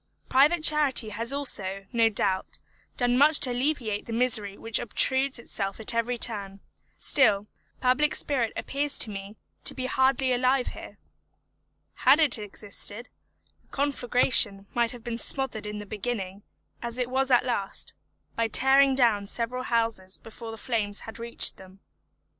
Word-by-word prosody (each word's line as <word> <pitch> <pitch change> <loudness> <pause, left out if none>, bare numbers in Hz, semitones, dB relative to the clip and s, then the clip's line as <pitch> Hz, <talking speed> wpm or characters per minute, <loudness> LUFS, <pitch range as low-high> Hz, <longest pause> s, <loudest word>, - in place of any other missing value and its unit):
Private 300 +5 +3
charity 290 -7 +4
has 230 +4 -2
also, 195 -9 -2
no 230 -1 +3
doubt, 190 -3 -2 0.4
done 245 0 +1
much 300 +2 +6
to 255 - +6
alleviate 245 -5 -2
the 230 - -6
misery 220 -4 +1
which 225 0 +1
obtrudes 260 +4 +1
itself 200 -4 -4
at 220 - +4
every 230 +1 -1
turn; 200 -4 -1 0.4
still, 215 -8 +3 0.4
public 260 +4 +1
spirit 250 -6 -1
appears 285 +1 -2
to 220 - +1
me 200 +1 -9 0.3
to - - 0
be 255 - -4
hardly 260 0 +1
alive 255 +1 +1
here. - - -11 1.0
Had 295 - +4
it 290 -8 +2
existed, 210 +2 -6 0.5
the - - -36
conflagration 245 -7 +1
might 235 -1 +1
have 240 -1 -11
been 235 0 -5
smothered 235 -7 0
in 210 0 -6
the 210 - -8
beginning, 205 -2 -5 0.4
as 235 0 -6
it 250 -1 -1
was 265 +1 0
at 245 -1 +3
last, 205 -6 -3 0.4
by 230 0 0
tearing 270 +3 +5
down 225 -6 +1
several 245 +4 -2
houses 225 -5 -1
before 225 0 -11
the 225 - -8
flames 215 -4 -3
had 225 +1 -11
reached 235 0 +3
them. 190 +1 -16
235 Hz, 155 wpm, -26 LUFS, 210-260 Hz, 1.0 s, much